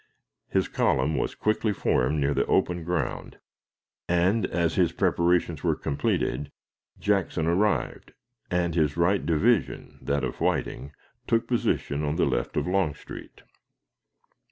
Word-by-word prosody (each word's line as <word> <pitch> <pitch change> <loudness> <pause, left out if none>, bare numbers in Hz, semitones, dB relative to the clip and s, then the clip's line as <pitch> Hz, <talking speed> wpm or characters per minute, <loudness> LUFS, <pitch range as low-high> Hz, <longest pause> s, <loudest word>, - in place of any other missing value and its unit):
His - - +1
column 65 +4 +1
was - - -2
quickly 110 0 0
formed 75 -4 +1
near 70 0 +1
the - - 0
open 85 -1 +1
ground, 85 -5 -3 0.7
and, 90 +6 +2
as 85 -1 0
his 85 -3 +2
preparations 85 -3 +1
were - - +2
completed, 70 +1 -1 0.5
Jackson 95 -5 0
arrived, 95 +5 0 0.4
and 85 -1 0
his 80 -2 +1
right 90 +4 +2
division 95 +5 0
that 70 0 -1
of 65 - -4
Whiting 70 - -1 0.4
took 115 0 +2
position 95 - -1
on 75 +1 -1
the - - +2
left - - -2
of - - +1
Longstreet. 90 -10 -3
85 Hz, 130 wpm, -26 LUFS, 75-95 Hz, 0.7 s, and